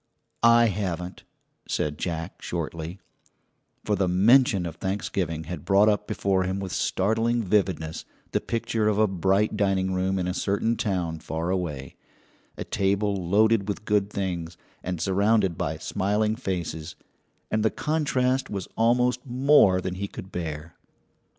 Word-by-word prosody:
"I 115 0 +6
haven't," 90 -4 -3 0.4
said 75 -1 -2
Jack 85 +1 -4
shortly; 85 +1 -5 0.9
for 105 - +1
the 95 -2 +1
mention 100 +1 +4
of 80 -1 -6
Thanksgiving 95 -4 -2
had 85 -2 -6
brought 100 +1 +4
up 105 -1 +1
before 100 -3 0
him 95 +1 -1
with 95 -2 -5
startling 115 +7 +1
vividness 90 -5 0 0.3
the - - 0
picture 115 -1 -1
of 105 -1 +2
a 110 - +5
bright 95 +2 +1
dining 95 -2 +1
room 95 +1 0
in 90 -1 -1
a 90 - -1
certain 100 +4 0
town 90 -8 -2
far 80 +2 -3
away, 75 -8 -3 0.6
a - - -3
table 100 +1 0 0.2
loaded 110 +1 +3
with 100 +1 -4
good 105 -1 +1
things, 90 -4 -4 0.2
and 90 -1 -4
surrounded 100 +1 +2
by - - -2
smiling 105 +3 0
faces, 85 - -4 0.6
and 110 - +1
the 110 - +4
contrast 135 -4 0
was 100 -3 -4
almost 125 +2 +2
more 130 -7 +4
than 90 - -3
he 100 +2 -4
could 95 -1 -10
bear. 80 -1 -5
95 Hz, 145 wpm, -26 LUFS, 90-110 Hz, 0.9 s, I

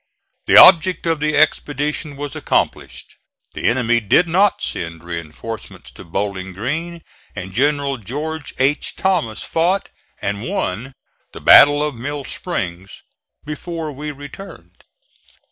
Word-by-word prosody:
The - - +6
object 180 0 +7
of 165 -2 0
the 150 0 0
expedition 150 -1 0
was 145 0 -6
accomplished. - - -2 0.4
The - - -6
enemy 120 -1 +2
did 115 - +3
not 190 +5 +2
send 85 -1 -5
reinforcements 85 +6 -8
to - - -12
Bowling 95 +1 -4
Green, 160 - -4 0.3
and 95 +1 -7
General 140 +2 +1
George 145 +8 -5
H. 135 +3 0
Thomas 170 - -1
fought 180 +4 0 0.3
and 100 +1 -3
won 120 +2 -3 0.4
the - - -10
battle 145 +1 +7
of 150 -1 -2
Mill 140 +4 -5
Springs 95 - -5 0.4
before 155 +1 -5
we 150 +2 -6
returned. 145 +7 -11
145 Hz, 125 wpm, -19 LUFS, 110-160 Hz, 0.4 s, object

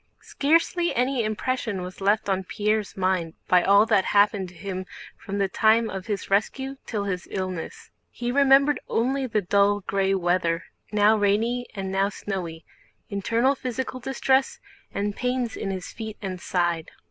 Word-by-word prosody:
Scarcely 335 +4 +1
any 250 0 +1
impression 215 -2 -2
was 185 +2 -9
left 205 +2 +2
on 190 -1 0
Pierre's 210 +2 -1
mind 185 -3 0
by 180 -1 +5
all 200 +3 +5
that 210 -4 +3
happened 200 -2 +3
to 180 - -17
him 185 0 -5 0.3
from 200 - -6
the 200 -1 +2
time 220 +3 +3
of 190 -1 -6
his 205 -2 -3
rescue 265 +7 0
till 210 -3 -2
his 185 -3 -3
illness. 185 -3 -5 0.2
He 240 0 -3
remembered 280 +2 +5
only 260 +3 0
the 215 -3 0
dull 200 +2 +3
gray 195 0 0
weather 175 -2 +1 0.3
now 210 +1 +4
rainy 225 +4 +1
and 190 -1 -4
now 195 +1 +2
snowy, 180 -5 -5 0.5
internal 230 +6 +2
physical 255 -1 -4
distress, 265 +1 +1 0.3
and 200 0 -2
pains 250 -2 -1
in 200 - -4
his 185 -2 -5
feet 220 -2 -7
and 185 -3 -5
side. 175 -3 -1
205 Hz, 160 wpm, -25 LUFS, 190-240 Hz, 0.5 s, by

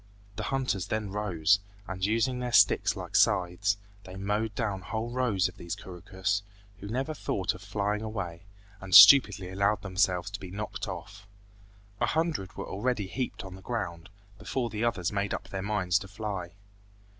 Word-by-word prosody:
The 110 - -4
hunters 130 -9 -1
then 110 -2 -2
rose, 100 -2 +2 0.3
and 95 -1 -6
using 115 +5 +1
their 125 -1 -3
sticks 105 -4 +5
like - - -7
scythes, 95 +2 +3 0.3
they 95 - -10
mowed 105 +3 -2
down 100 -5 -2
whole 110 +5 -4
rows 115 -7 +1
of 90 - -11
these 85 - -5
couroucous, 95 +3 -3 0.4
who 100 - -8
never 130 +8 -2
thought 95 -10 -1
of 90 - -12
flying 105 +1 -2
away, 95 -7 -5 0.4
and 95 -2 0
stupidly 105 -3 +9
allowed 100 +1 +1
themselves 95 -1 0
to 100 - -5
be 95 - -8
knocked 105 +3 -5
off. 100 0 -8 0.7
A - - +2
hundred 155 - -1
were - - -4
already 105 +1 -1
heaped 120 +3 -4
on 95 - -8
the 95 - -11
ground, 95 -7 -4 0.3
before 120 +3 -2
the 110 +1 -3
others 95 -7 0
made 100 0 -1
up - - -8
their 95 - -4
minds 100 -2 +1
to 100 - -9
fly. 100 -4 -5
100 Hz, 170 wpm, -29 LUFS, 95-110 Hz, 0.7 s, stupidly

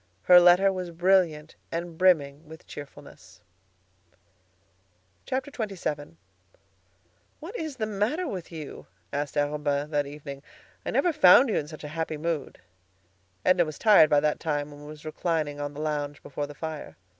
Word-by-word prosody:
Her 180 0 +8
letter 180 +2 +5
was 185 -2 -4
brilliant 170 -3 +1 0.2
and 170 0 -4
brimming 160 -4 +2
with 160 +1 -13
cheerfulness. 140 -9 -12 1.9
XXVII 200 - -4 1.2
"What 355 +9 -9
is 315 - -4
the 225 -4 -2
matter 215 - -1
with 185 - -6
you?" 155 -3 -8 0.3
asked 145 +1 -3
Arobin 145 0 -1
that 145 -1 0
evening. 140 -1 -8 0.4
"I - - -4
never 350 - +2
found 260 -2 +7
you - - 0
in 145 - -2
such 155 0 -10
a - - -5
happy 160 0 -3
mood." 160 -2 -3 0.9
Edna 180 -1 +5
was 155 -2 -6
tired 205 -8 +6
by 145 -1 +4
that 150 0 0
time, 145 -2 -2
and 145 0 -12
was 150 0 -11
reclining 155 -2 -2
on 145 0 -5
the 150 - -6
lounge 150 -1 -3
before 145 +1 -4
the 145 - -11
fire. 160 0 -7
155 Hz, 150 wpm, -27 LUFS, 145-185 Hz, 1.9 s, Her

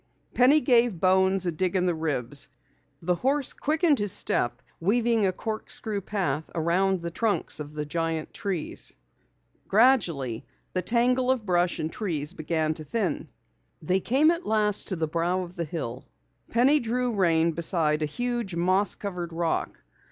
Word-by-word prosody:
Penny 275 +5 +5
gave 240 - +3
Bones 190 +1 +3
a 175 - 0
dig 180 +3 -2
in 180 -1 +2
the 180 - +1
ribs. 145 -5 0 0.5
The 180 +2 +2
horse 270 +8 0
quickened 310 -1 +1
his 205 -2 +1
step, 120 -6 +1 0.2
weaving 225 +3 +2
a - - +1
corkscrew 215 0 -4
path 160 -7 -2
around 180 +3 +1
the 170 - -4
trunks 210 0 0
of 150 0 -8
the 150 0 -3
giant 165 +1 -3
trees. 190 -6 -2 0.7
Gradually 175 - +2 0.3
the 185 - 0
tangle 250 +5 +2
of 255 -4 +1
brush 175 -2 +1
and 155 +1 -4
trees 160 -6 -2
began 160 -2 -1
to 155 - -8
thin 190 +5 -1
out. - - -12 0.6
They 185 +1 +2
came 275 - +3
at 340 +1 -3
last 210 -1 +2
to 190 - +1
a - - -8
clearing - - -10
at - - +3
the - - -16
brow 175 +2 0
of 180 0 -10
the 170 - -3
hill. 135 -6 -5 0.4
Penny 265 +6 +4
drew 245 0 -1
rein 170 -4 +2
beside 160 -2 +1
a - - +1
huge, 240 +1 -3
moss 185 +4 +1
covered 180 -4 -5
rock. 165 -1 -2
185 Hz, 170 wpm, -26 LUFS, 165-225 Hz, 0.7 s, Penny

